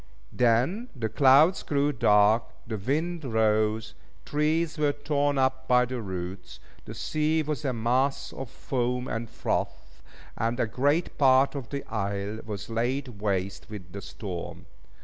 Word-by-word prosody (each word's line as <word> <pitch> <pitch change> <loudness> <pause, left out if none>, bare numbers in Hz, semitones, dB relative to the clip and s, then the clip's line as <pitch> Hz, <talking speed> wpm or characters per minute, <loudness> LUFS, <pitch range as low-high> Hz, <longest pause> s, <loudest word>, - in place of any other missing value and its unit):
Then 130 - +2
the 115 -3 -2
clouds 145 - +5
grew 145 0 +1
dark, 105 0 +4 0.2
the 110 -2 -4
wind 160 - -1
rose, 110 -2 +1 0.3
trees 155 +1 0
were 145 -1 +2
torn 145 -1 0
up 130 0 +1
by 125 0 +5
the 125 0 -4
roots, 90 -2 -6 0.3
the - - -8
sea 155 +1 0
was 150 0 -3
a 135 - 0
mass 130 +4 0
of 135 -2 -6
foam 125 0 -2
and 115 0 -4
froth, - - -3 0.3
and 115 +2 -1
a - - +3
great 145 - 0
part 135 -1 +5
of 135 -5 -6
the 140 -1 -4
isle 100 0 -3
was 105 -3 -5
laid 120 0 -2
waste 95 -2 -2
with 95 -5 -9
the 100 - -7
storm. 95 -3 -7
125 Hz, 150 wpm, -27 LUFS, 110-145 Hz, 0.3 s, clouds